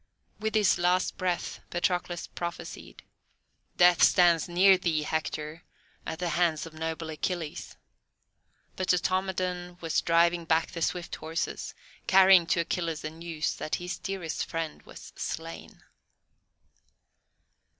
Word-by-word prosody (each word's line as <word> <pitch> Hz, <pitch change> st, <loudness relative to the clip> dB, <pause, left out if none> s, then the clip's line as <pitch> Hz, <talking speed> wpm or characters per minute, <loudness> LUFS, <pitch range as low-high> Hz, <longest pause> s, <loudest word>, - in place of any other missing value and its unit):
With 220 Hz, +1 st, -2 dB
his 210 Hz, -3 st, +4 dB
last 180 Hz, +1 st, +2 dB
breath 180 Hz, -2 st, -2 dB
Patroclus 175 Hz, 0 st, -1 dB
prophesied: 170 Hz, 0 st, -7 dB, 0.7 s
"Death 175 Hz, -1 st, +6 dB
stands 175 Hz, -2 st, +5 dB
near 190 Hz, +3 st, +6 dB
thee, 170 Hz, -4 st, 0 dB
Hector, 155 Hz, +1 st, -3 dB, 0.5 s
at 160 Hz, -, -3 dB
the 175 Hz, 0 st, -2 dB
hands 165 Hz, -1 st, +1 dB
of 165 Hz, -, -11 dB
noble 160 Hz, 0 st, -4 dB
Achilles." 160 Hz, 0 st, -4 dB, 1.0 s
But 185 Hz, -, -3 dB
Automedon 180 Hz, -1 st, -1 dB
was 165 Hz, -2 st, 0 dB
driving 170 Hz, 0 st, +3 dB
back 165 Hz, 0 st, +1 dB
the 165 Hz, -, -6 dB
swift 175 Hz, +1 st, -2 dB
horses, 160 Hz, +2 st, -4 dB, 0.3 s
carrying 190 Hz, -2 st, +7 dB
to 170 Hz, -, +2 dB
Achilles 165 Hz, -2 st, -2 dB
the 155 Hz, -, -4 dB
news 165 Hz, -1 st, -3 dB
that 155 Hz, -, -2 dB
his 180 Hz, +1 st, -5 dB
dearest 190 Hz, -5 st, -3 dB
friend 165 Hz, -1 st, -4 dB
was -, -, -12 dB
slain. 165 Hz, +1 st, -6 dB
170 Hz, 120 wpm, -28 LUFS, 160-180 Hz, 1.0 s, carrying